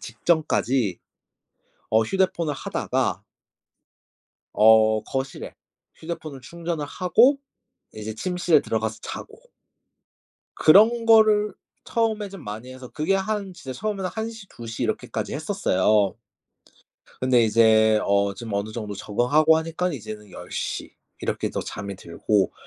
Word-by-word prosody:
직전까지 130 - 0 0.9
어 110 +1 +4
휴대폰을 170 - 0
하다가 - - -2 1.3
어 110 0 +5
거실에 135 0 -5 0.4
휴대폰을 160 -4 -7
충전을 170 +1 -4
하고 225 - +3 0.6
이제 110 0 -6
침실에 175 +3 +2
들어가서 110 0 -2
자고. - - -8 1.1
그런 225 +7 +5
거를 215 -2 +5 0.3
처음에 220 -3 -1
좀 195 -5 -11
많이 110 +5 -7
해서 130 -1 -10
그게 155 +9 -1
한 195 0 -2
진짜 135 -7 -8
처음에는 200 -3 -2
1 220 +1 -3
시, 220 -3 -11
2 115 - -11
시 115 - -5
이렇게까지 - - -3
했었어요. 100 +1 +1 1.0
근데 125 -2 +4
이제 110 0 +4
어 100 0 +2
좀 110 +2 -7
어느 100 +2 -2
정도 105 -3 -5
적응하고 125 +11 +3
하니깐 165 +2 -2
이제는 105 -5 -8
10 - - -11
시 - - -4 0.3
이렇게도 - - -2
잠이 100 -1 -6
들고 95 +2 0
130 Hz, 255 characters per minute, -24 LUFS, -, 1.3 s, 어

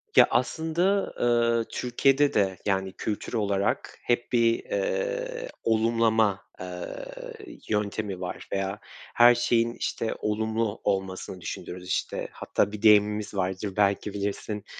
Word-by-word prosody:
Ya, - - +8
aslında, 165 +10 +1
ııı, 115 -1 +2
Türkiye'de 135 +3 +2
de, 95 -3 +2
yani, 95 -1 0
kültür 105 +2 -4
olarak 100 -3 0
hep 120 0 0
bir, 115 -1 +4
eee, - - -2
olumlama, 110 -2 +2 0.2
eee, 90 - -6 0.6
yöntemi 105 -2 -1
var 90 - -5
veya 95 +1 -2 0.4
her 120 0 +8
şeyin, 120 -1 +2
işte, 115 -2 -2
olumlu 110 0 -1
olmasını 95 -2 -2
düşünürüz, 90 +1 -6
işte. 95 - -2
Hatta 100 - -1
bir 105 0 -7
deyimimiz 105 -1 +4
vardır, 95 +1 -2
belki 100 0 +2
bilirsin. 105 +1 -3
110 Hz, 120 wpm, -27 LUFS, 100-120 Hz, 0.6 s, Ya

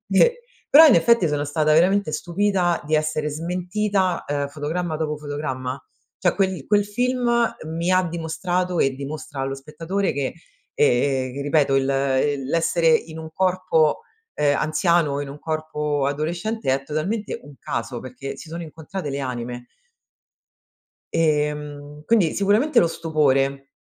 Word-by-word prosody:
E 475 - +4 0.3
però, 315 +3 +9
in 280 - +6
effetti, 185 +2 +4
sono 145 -1 -1
stata 155 +1 +1
veramente 185 +2 +3
stupita 175 +2 0
di 155 +1 +1
essere 155 0 0
smentita, 180 +4 -1
uhm, 145 0 -1
fotogramma 155 +4 -3
dopo 155 -1 -2
fotogramma, 140 -3 -4 0.4
cioè 180 - +2
quel 190 -7 0
quel 205 -1 +3
film 240 +1 +1
mi 165 +2 -2
ha 185 0 +4
dimostrato 175 +1 -2
e, 135 - +2
dimostra 140 +1 -6
allo 135 0 -2
spettatore, 165 +8 -3
che 140 -2 -2 0.4
ehm, 130 -1 +2
che 140 - -5
ripeto 145 -1 +2
il 135 - +4 0.6
il 135 - -6
l'essere 165 +2 +1
in 160 0 +2
un 160 0 -7
corpo, 185 -4 +2 0.3
uhm, 145 -1 +2
anziano 155 -1 +1
e - - -2
in 140 - -8
un 140 +2 -9
corpo 150 -2 -2
adolescente 170 +7 -2
è 135 +1 -2
totalmente 185 +10 -3
un 145 0 -13
caso, 115 +1 -4
perché 135 +2 -7
si 155 - -11
sono 170 +1 -5
incontrate 160 +2 -6
le 140 0 -3
anime. 120 -2 -5 1.5
Ehm, 150 -1 -1
quindi 205 -9 +3
sicuramente 220 +7 +3
lo - - +4
stupore. 140 -4 0
155 Hz, 145 wpm, -23 LUFS, 145-180 Hz, 1.5 s, però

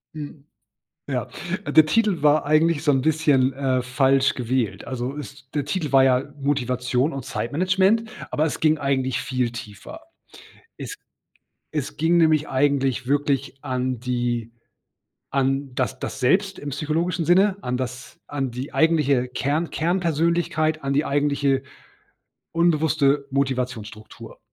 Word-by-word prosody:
Hm, 145 -1 -8 0.6
ja, - - -2 0.4
äh, - - -3
der 155 -1 +7
Titel 210 -2 +1
war 150 0 +4
eigentlich 155 +1 +2
so 145 - +4
'n 135 -1 +2
bisschen, 145 -4 +2
äh, 130 -2 0
falsch 135 +1 +2
gewählt. 120 -5 -2
Also 130 +1 -3
ist 140 -2 -10
der 145 -2 -1
Titel 165 -7 -2
war 135 -1 +6
ja 130 +2 +2
Motivation 125 0 0
und 135 -2 -6
Zeitmanagement, 185 - +1 0.2
aber 155 - +1
es 155 - -3
ging 155 0 +3
eigentlich 135 -2 0
viel 125 -3 -1
tiefer. 120 - -9 0.8
Es - - -6 0.8
es 150 -4 -3
ging 165 +2 +2
nämlich 155 -2 +3
eigentlich 135 -2 +1
wirklich 140 -1 0
an 130 -3 -2
die 120 -2 -2 0.8
an 135 -1 0
das 130 0 -2
das 135 - -5
Selbst 190 +9 +2
im 145 - -6
psychologischen 160 +4 -1
Sinne, 190 +3 +4
an 125 0 -2
das 130 0 -6
an 135 -3 -3
die 125 +4 -6
eigentliche 145 -6 +2
Kern 145 +6 -1
Kernpersönlichkeit, 165 -2 0
an 135 0 -1
die 145 +2 +2
eigentliche 140 -1 +1 0.9
unbewusste 155 -4 +2
Motivationsstruktur. 125 -6 -4
140 Hz, 135 wpm, -23 LUFS, 130-155 Hz, 0.9 s, der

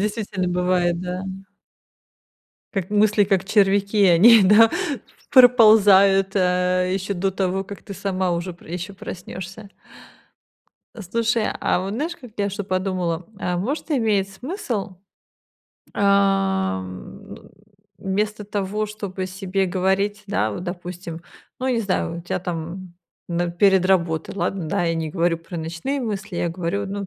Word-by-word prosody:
действительно 205 -3 -2
бывает, 180 -1 +1
да. 180 0 -4 1.5
Как 190 -2 -3
мысли, 210 0 +3
как 190 -1 +1
червяки, 200 0 +3
они, 205 +6 +7
да, 210 +4 +6 0.6
проползают, 205 -6 +6
э, 180 0 +1
ещё 195 +1 -2
до 190 +1 0
того, 190 0 -1
как 200 +1 -10
ты 200 - -8
сама 190 -1 -1
уже 175 +2 -3
п 170 - -20
ещё 180 +3 -5
проснёшься. 190 +2 -8 1.3
Слушай, 230 +2 -1
а - - +1
вот 190 +2 -4
знаешь, 320 +8 -3
как 250 -6 -13
я 200 0 +1
что 200 +1 -5
подумала, 185 -3 -2
а 180 -3 -2
может, 275 - -3
имеет 215 -8 +1
смысл, 220 - -5 1.0
ам, 195 - 0 0.6
вместо 210 +2 -2
того, 205 +1 -2
чтобы 200 -3 -5
себе 190 0 -2
говорить, 190 +3 0
да, 195 - 0
вот 105 - -6
допустим, 175 -2 -7 0.4
ну, 260 - -2
не 245 -3 +1
знаю, 185 -4 -2
у - - -6
тя 175 - -3
там 175 +1 -6 0.3
н 175 0 -1
перед 190 +1 +4
работой. 170 -4 0
Ладно, 195 -3 -2
да, 175 - 0
я 165 -1 0
не 160 -1 -3
говорю 170 0 0
про 170 +1 -9
ночные 170 - -3
мысли, 205 -5 -4
я 170 - 0
говорю, 180 +4 -3
ну, 200 0 -5
190 Hz, 135 wpm, -22 LUFS, 180-205 Hz, 1.5 s, они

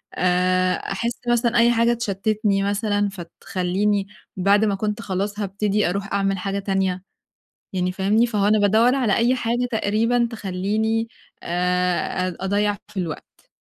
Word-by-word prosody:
آآ، 185 0 +2
أحس 235 +4 -3
مثلًا 240 0 +2
أي 235 +1 +5
حاجة 235 0 +3
تشتّتني 210 -2 0
مثلًا 205 0 0
فتخلّيني 195 +2 -2 0.3
بعد 200 +3 +3
ما 205 -2 +1
كنت 210 +2 -3
خلاص 200 +1 -3
هابتدي 205 0 0
أرُوح 195 +2 -3
أعمل 195 -1 +1
حاجة 195 +2 -2
تانية، 190 -2 -1 0.7
يعني 180 -1 0
فاهمني؟ 200 +5 +2
فهو 205 -3 +1
أنا 215 +1 +4
بادوّر 220 +5 +4
على 240 -7 +2
أي 240 +2 +3
حاجة 240 0 -1
تقريبًا 230 +2 +1
تخلّيني 215 +3 -1 0.4
آآ 180 0 0
أ 180 - -9
أضيّع 205 +1 +1
في 195 - -5
الوقت. 165 -4 -7
200 Hz, 140 wpm, -22 LUFS, 190-220 Hz, 0.7 s, أي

